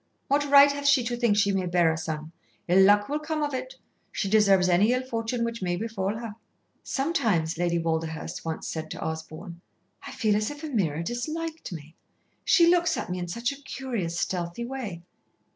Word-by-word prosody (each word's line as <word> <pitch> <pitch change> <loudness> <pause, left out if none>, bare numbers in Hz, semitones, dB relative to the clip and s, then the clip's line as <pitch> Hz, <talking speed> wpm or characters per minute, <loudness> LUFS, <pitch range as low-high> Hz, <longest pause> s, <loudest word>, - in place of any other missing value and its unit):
What 290 +1 +2
right 280 0 +8
hath 285 0 -3
she 280 -3 +5
to 240 +1 -2
think 235 -4 +2
she 200 -1 +3
may 190 -2 -1
bear 175 -2 +3
a - - -3
son. 160 -1 -5 0.4
Ill 180 +2 +5
luck 205 +1 +5
will 295 +2 -1
come 305 0 -2
of 290 -1 -2
it. - - -5 0.4
She 195 - -2
deserves 195 -3 +4
any 195 +7 +4
ill 255 +1 0
fortune 235 -1 -2
which 230 -1 -3
may 175 -1 0
befall 205 0 -2
her." 230 -2 -6 0.5
"Sometimes," 220 - 0
Lady 175 -1 +1
Walderhurst 165 +1 -3
once 160 -1 -4
said 160 -1 -5
to - - -7
Osborn, 160 +2 -6 0.5
"I - - -7
feel 215 -3 +1
as 210 0 0
if 290 +1 -9
Ameerah 185 - -1
disliked 310 - -4
me. 160 -2 -9 0.5
She 340 - +5
looks 345 -1 +3
at - - -4
me 180 - -2
in 175 - -4
such 235 +8 -2
a 280 0 -10
curious, 235 -12 -4
stealthy 175 +5 -3
way." 230 -10 -6
205 Hz, 195 wpm, -26 LUFS, 170-265 Hz, 0.5 s, right